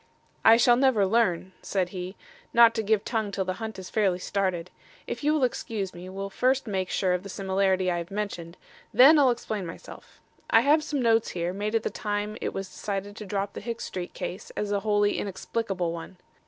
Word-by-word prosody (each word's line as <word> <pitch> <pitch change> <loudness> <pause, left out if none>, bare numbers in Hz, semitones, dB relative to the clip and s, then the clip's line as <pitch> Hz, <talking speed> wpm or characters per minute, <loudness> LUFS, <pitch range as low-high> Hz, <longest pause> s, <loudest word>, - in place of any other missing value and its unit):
"I 225 +1 +8
shall 240 0 +5
never 255 -6 +4
learn," 190 -4 +1
said 185 -3 -1
he, 185 +1 -6 0.4
"not 235 -1 +8
to 225 - -1
give 215 -1 +1
tongue 220 -3 -1
till 195 -1 -2
the 185 - -1
hunt 220 -2 -5
is 185 -1 -8
fairly 195 -5 +2
started. 185 -2 -2 0.3
If - - -5
you 300 - +3
will 305 -3 +1
excuse 220 -5 -2
me 180 +1 -9
we'll 195 +1 -5
first 260 +5 +1
make 190 -4 -2
sure 185 -2 +1
of 180 - -1
the 200 - -9
similarity 190 -1 +1
I 175 - -1
have 170 0 -6
mentioned. 190 -4 -5 0.3
Then 270 +7 +8
I'll 275 -3 +5
explain 220 -4 -2
myself. 165 -1 -11 0.3
I - - +6
have 300 +2 +4
some 285 -4 -2
notes 225 -1 +3
here, 175 0 -2
made 210 +3 -2
at 225 - +1
the - - -2
time 210 0 -3
it - - -2
was 195 0 -5
decided 200 +1 -5
to 210 - -7
drop 200 0 -2
the - - -7
Hicks 230 +2 -4
Street 180 -1 -6
case 185 - -6
as 210 -1 -2
a 200 - +1
wholly 205 0 +1
inexplicable 195 -2 -2
one. 170 +2 -8
200 Hz, 210 wpm, -27 LUFS, 185-225 Hz, 0.4 s, I